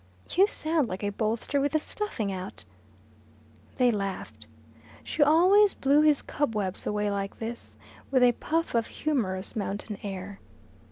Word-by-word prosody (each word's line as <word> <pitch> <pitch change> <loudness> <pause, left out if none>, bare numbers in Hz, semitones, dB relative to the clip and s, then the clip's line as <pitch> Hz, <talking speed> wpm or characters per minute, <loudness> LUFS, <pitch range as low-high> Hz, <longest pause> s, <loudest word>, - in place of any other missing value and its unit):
"You 385 +3 +5
sound 315 - 0
like 185 +2 -5
a 205 - 0
bolster 225 +6 -1
with 285 0 0
the 310 - +3
stuffing 300 - -4
out." 185 0 -7 1.1
They 250 -2 +4
laughed. 195 -3 -5 0.6
She 320 - -3
always 365 +7 +5
blew 280 +2 +3
his 300 -2 +3
cobwebs 215 -10 -2
away 210 0 0
like 195 0 -3
this, 230 +1 -7 0.3
with 260 -2 +3
a 245 - +7
puff 325 +7 -2
of 230 -1 +1
humorous 210 -10 -2
mountain 205 0 -4
air. 195 0 -6
235 Hz, 145 wpm, -27 LUFS, 200-300 Hz, 1.1 s, a